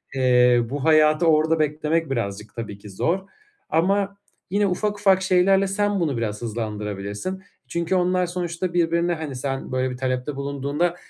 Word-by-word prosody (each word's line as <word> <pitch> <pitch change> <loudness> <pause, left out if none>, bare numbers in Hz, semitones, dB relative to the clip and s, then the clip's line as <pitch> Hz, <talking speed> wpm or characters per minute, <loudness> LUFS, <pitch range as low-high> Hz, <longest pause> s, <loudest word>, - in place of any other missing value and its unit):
Eee, 125 -2 +4
bu 140 +1 -4
hayatı 155 +1 +4
orada 160 0 +3
beklemek 155 +1 0
birazcık 105 -4 -4
tabii 110 -3 -6
ki 105 - -11
zor 165 - 0 0.5
ama 195 +5 +1 0.3
yine 200 +2 +2
ufak 205 +3 -1
ufak 195 -2 +4
şeylerle 190 +1 +3
sen 205 +1 0
bunu 150 -7 0
biraz 105 -2 -3
hızlandırabilirsin. 105 - -4 0.2
Çünkü 170 +6 -1
onlar 180 0 +2
sonuçta 175 0 -3
birbirine, 170 0 +2
hani, 155 -4 -5
sen 135 +1 -4
böyle 130 0 0
bir 125 - -6
talepte 130 +2 -2
bulunduğunda, 140 +5 -1
155 Hz, 150 wpm, -23 LUFS, 125-180 Hz, 0.5 s, Eee